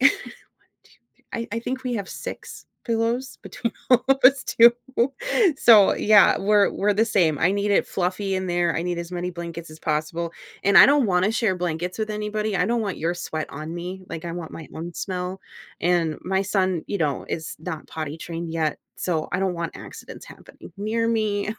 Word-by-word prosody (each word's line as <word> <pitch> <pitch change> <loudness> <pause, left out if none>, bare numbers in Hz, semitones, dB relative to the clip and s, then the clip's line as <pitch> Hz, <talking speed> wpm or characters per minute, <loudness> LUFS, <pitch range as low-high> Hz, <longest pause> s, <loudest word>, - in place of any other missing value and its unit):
1, 270 +3 +7 0.7
2, - - -24 0.3
3 - - -33
I 230 0 -4
I 230 - -1
think 255 +2 -4
we 245 -1 -1
have 200 -3 -4
6 - - -8 0.2
pillows 235 +2 -1
between 235 - -4 0.2
all 250 -1 +5
of 270 - +4
us 270 +1 +7
too, 235 +1 +6 0.8
so, 215 -6 +7
yeah, 210 -1 +5
we're 205 0 +3
we're 205 0 0
the 220 - +3
same, 170 -9 +2
I 175 - +3
need 205 +1 0
it 200 - +3
fluffy 190 +2 -2
in 185 0 -2
there, 175 -1 +1
I 165 - -1
need 175 -1 -2
as 170 +1 -6
many 180 0 -3
blankets 170 -2 -7
as 155 - -12
possible, 165 +2 -2 0.3
and 200 0 +6
I - - +10
don't 280 -4 +4
wanna 185 +2 +2
share 215 -6 +1
blankets 175 +2 -3
with 215 0 -2
anybody, 210 -1 -2
I 180 - +1
don't 235 +1 +1
want 200 -4 -3
your 170 +2 -1
sweat 155 -3 -4
on 155 +4 -7
me, 180 +2 -6
like, 160 - -6
I 170 - -4
want 170 -2 -7
my 160 - -9
own 170 +1 -6
smell, 185 0 -4 0.4
and 170 -3 +1
my 190 +1 0
son, 190 -4 0
you 200 - -2
know, 145 -5 -1
is 160 -1 -4
not 160 -1 -6
potty 155 -1 -5
trained 165 0 -6
yet, 160 -2 -1 0.2
so 160 -4 -2
I - - +1
don't 190 -2 0
want 170 -1 -4
accidents - - -10
happening - - -14
near 225 +3 -1
me, 215 -2 0
185 Hz, 205 wpm, -24 LUFS, 170-215 Hz, 0.8 s, I